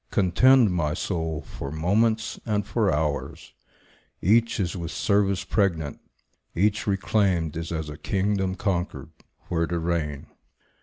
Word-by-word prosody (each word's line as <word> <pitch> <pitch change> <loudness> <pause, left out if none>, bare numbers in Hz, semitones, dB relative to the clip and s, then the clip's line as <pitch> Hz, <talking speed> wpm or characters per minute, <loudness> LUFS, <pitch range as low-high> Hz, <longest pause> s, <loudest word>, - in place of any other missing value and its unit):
Contend, 110 +5 +4
my 75 -4 0
soul, 80 -4 -3
for 70 - -7
moments 110 +8 +1
and 105 -3 -1
for 105 -2 +1
hours; 75 -1 -2 0.7
Each 115 +5 +3
is 90 -2 -1
with 85 -3 -4
service 100 -1 +1
pregnant; 85 -8 0 0.6
each 105 +5 +1
reclaimed 95 -5 +1
Is 80 +1 -4
as 80 -2 -3
a 75 -1 -7
kingdom 95 +1 0
conquered, 90 -3 -2 0.4
where 85 -1 0
to 85 - -2
reign. 80 -4 -2
90 Hz, 130 wpm, -25 LUFS, 80-105 Hz, 0.7 s, Contend